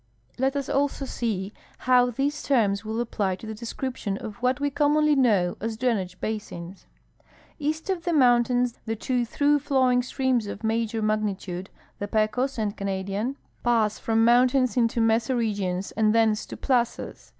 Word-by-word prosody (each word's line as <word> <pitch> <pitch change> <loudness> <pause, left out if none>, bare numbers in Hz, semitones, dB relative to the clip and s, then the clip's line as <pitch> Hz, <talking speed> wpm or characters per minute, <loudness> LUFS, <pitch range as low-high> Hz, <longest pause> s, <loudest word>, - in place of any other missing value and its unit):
Let 265 +2 +1
us 280 -1 -2
also 280 0 0
see 210 -6 -3 0.3
how 250 -1 +5
these 275 +5 -2
terms 210 -7 +2
Avill 220 +1 -4
apply 205 -5 -1
to 190 - -12
the 220 - -5
description 235 -2 -4
of 215 +1 -7
what 250 +2 0
we 285 0 0
commonly 300 +1 +3
know 205 -10 +2
as 225 0 -3
drainage 200 -7 -1
basins. 195 -4 -6 0.7
East 310 +3 -2
of 375 -3 -2
the 345 - -1
mountains 245 -3 +3
the 225 - -1
two 245 +2 -1
through 290 +5 +2
flowing 260 -3 +2
streams 255 -3 0
of 200 - -7
major 225 0 -1
magnitude, 200 -3 -2 0.3
the 205 - -3
Pecos 220 +6 0
and 210 -2 -1
Canadian, 200 +6 -3 0.3
pass 225 -3 +2
from 225 0 +2
mountains 250 0 +4
into 235 -1 +1
mesa 225 +3 +2
regions 200 -5 -1
and 220 0 +2
thence 220 -2 +2
to - - -8
plazas. 245 -3 -1
230 Hz, 160 wpm, -25 LUFS, 210-260 Hz, 0.7 s, how